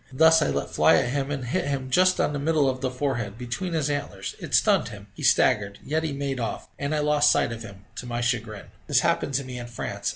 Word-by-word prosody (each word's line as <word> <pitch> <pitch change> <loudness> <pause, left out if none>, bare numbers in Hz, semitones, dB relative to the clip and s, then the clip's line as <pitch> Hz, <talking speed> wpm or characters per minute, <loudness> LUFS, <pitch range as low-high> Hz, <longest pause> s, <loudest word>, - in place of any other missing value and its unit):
Thus 160 +4 +5
I - - +2
let 70 - -2
fly - - +5
at - - +1
him, 140 0 -1
and 140 -3 -3
hit 145 +6 -1
him 135 -2 -3
just 185 +4 +4
on 150 - +1
the 145 - -2
middle 150 -1 +2
of 130 -1 -2
the 130 - 0
forehead, 125 -6 -3
between 125 +9 -4
his 155 -3 0
antlers; 145 -1 -4
it - - -2
stunned - - +3
him - - -10
he - - -11
staggered 100 -1 +3
yet 155 +2 0
he 160 -2 -3
made 140 -1 -3
off, 115 - -4
and 145 +2 -1
I - - 0
lost 150 0 +3
sight - - +1
of 115 0 -6
him, 100 -3 -11
to 125 - -6
my 120 0 -3
chagrin. 115 -4 -3 0.2
This - - +3
happened 140 - 0
to 140 - 0
me 125 -1 -7
in 120 - -7
France. 120 - -4
135 Hz, 255 wpm, -25 LUFS, 120-150 Hz, 0.2 s, Thus